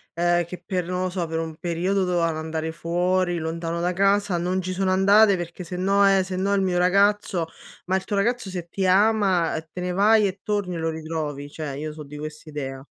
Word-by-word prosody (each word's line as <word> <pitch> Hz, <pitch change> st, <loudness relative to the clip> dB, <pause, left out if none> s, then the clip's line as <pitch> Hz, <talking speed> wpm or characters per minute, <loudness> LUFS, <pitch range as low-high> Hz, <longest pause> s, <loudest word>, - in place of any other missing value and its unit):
uhm, 175 Hz, 0 st, +2 dB
che 175 Hz, +1 st, -9 dB
per 180 Hz, -3 st, -2 dB
non 180 Hz, 0 st, -2 dB
lo 185 Hz, -, 0 dB
so, 175 Hz, -2 st, -2 dB
per 160 Hz, 0 st, -3 dB
un 160 Hz, -1 st, -4 dB
periodo 180 Hz, +3 st, 0 dB
dovevano 170 Hz, -3 st, 0 dB
andare 160 Hz, 0 st, -3 dB
fuori 175 Hz, +2 st, 0 dB
lontano 165 Hz, +1 st, -3 dB
da 175 Hz, +1 st, 0 dB
casa, 195 Hz, -1 st, +2 dB
non 180 Hz, +2 st, 0 dB
ci 185 Hz, 0 st, -3 dB
sono 190 Hz, 0 st, 0 dB
andate 200 Hz, +2 st, +5 dB
perché 175 Hz, +1 st, -6 dB
sennò 190 Hz, +3 st, +2 dB
eh 190 Hz, -, +2 dB
sennò 190 Hz, +2 st, -1 dB
il 195 Hz, -, +2 dB
mio 180 Hz, -2 st, +1 dB
ragazzo 195 Hz, -1 st, +2 dB, 0.4 s
ma 185 Hz, -, 0 dB
il 190 Hz, -, 0 dB
tuo 205 Hz, -, -3 dB
ragazzo 225 Hz, +1 st, 0 dB
se 175 Hz, -2 st, -5 dB
ti 190 Hz, +2 st, -1 dB
ama 190 Hz, -4 st, +3 dB
te 180 Hz, -, -6 dB
ne 180 Hz, 0 st, -2 dB
vai 210 Hz, +3 st, +4 dB
e 195 Hz, 0 st, -3 dB
torni 200 Hz, -4 st, -2 dB
e -, -, -4 dB
lo 165 Hz, 0 st, -1 dB
ritrovi. 155 Hz, -3 st, -4 dB
Cioè 150 Hz, -3 st, -5 dB
io 150 Hz, +2 st, -5 dB
so 155 Hz, -, -10 dB
di 150 Hz, +1 st, -10 dB
quest'idea. 150 Hz, -3 st, -6 dB
180 Hz, 215 wpm, -24 LUFS, 165-195 Hz, 0.4 s, andate